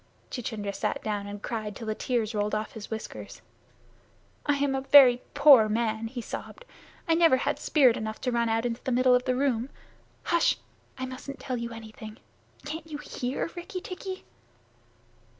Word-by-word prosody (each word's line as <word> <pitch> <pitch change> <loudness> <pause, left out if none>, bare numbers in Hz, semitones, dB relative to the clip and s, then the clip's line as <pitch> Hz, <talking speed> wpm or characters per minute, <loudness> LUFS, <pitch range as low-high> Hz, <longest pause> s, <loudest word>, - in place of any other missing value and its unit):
Chuchundra 215 -5 -4
sat 210 +1 -2
down 205 -2 -2
and 205 0 -8
cried 215 -3 -4
till 225 - -7
the 215 - -1
tears 230 -1 -1
rolled 210 0 0
off 215 0 -3
his 220 -2 -9
whiskers. 220 -1 -7 1.0
"I 290 - +3
am 280 -1 0
a 270 - -1
very 265 -3 +7
poor 280 -7 +8
man," 225 0 0
he 240 +1 -6
sobbed. - - -7 0.4
"I 330 - +4
never 330 -5 +5
had - - -1
spirit 260 -6 +4
enough 220 0 -4
to 250 - 0
run 235 -1 +1
out 225 +1 +1
into 240 0 -3
the 260 - -2
middle 255 +1 +4
of 250 0 +3
the 255 -1 +1
room. 255 -2 0 0.6
H'sh! 340 0 +4 0.4
I 260 - -3
mustn't 260 +2 -8
tell 255 -2 -3
you 235 0 -4
anything. 220 -1 -9 0.5
Can't 315 +2 -6
you 300 - -5
hear, 275 +1 -4
Rikki 365 +2 -6
tikki?" 370 +1 -7
245 Hz, 175 wpm, -28 LUFS, 220-275 Hz, 1.0 s, poor